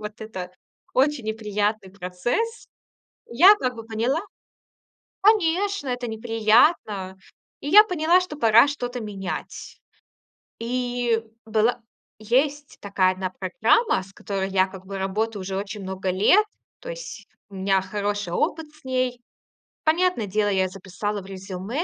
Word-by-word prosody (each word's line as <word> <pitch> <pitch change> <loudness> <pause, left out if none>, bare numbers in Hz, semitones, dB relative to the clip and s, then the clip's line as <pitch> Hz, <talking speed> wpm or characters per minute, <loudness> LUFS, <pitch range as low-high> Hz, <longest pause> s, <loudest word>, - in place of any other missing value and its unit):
Вот 210 0 -8
это 190 -5 -6 0.4
очень 270 -1 +2
неприятный 210 -2 -2
процесс. 200 - -3 0.6
Я, 360 - +7
как 255 -10 -2
бы, 225 - -8
поняла 230 +6 0 1.0
Конечно, 395 -4 +2
это 245 -1 -2
неприятно. 220 - +2 0.4
И 285 - -5
я 415 +7 +9
поняла, 355 -2 +3
что 360 -5 -6
пора 230 -1 +6
что-то 245 -3 -4
менять. 195 -4 -5 1.1
И 245 -1 -1 0.2
была 225 +2 +1 0.4
есть 275 +6 0
такая 190 -2 +2
одна 185 0 -4
программа, 195 - +1
с 190 +1 -15
которой 195 -1 -4
я, 190 -1 +3
как 190 -1 -12
бы, 195 0 -5
работаю 205 +3 -2
уже 190 0 -4
очень 205 +2 -5
много 190 0 -3
лет. 210 - +4 0.4
То - - -7
есть - - -8 0.2
у 200 - -15
меня 190 0 +2
хороший 205 -1 -3
опыт 320 - -1
с 305 - -22
ней. 255 -1 -1 0.7
Понятное 330 - +2
дело, 205 +1 +1
я 190 -2 +2
записала 195 +2 -5
в - - -14
резюме, 195 - -5
220 Hz, 135 wpm, -24 LUFS, 195-270 Hz, 1.1 s, я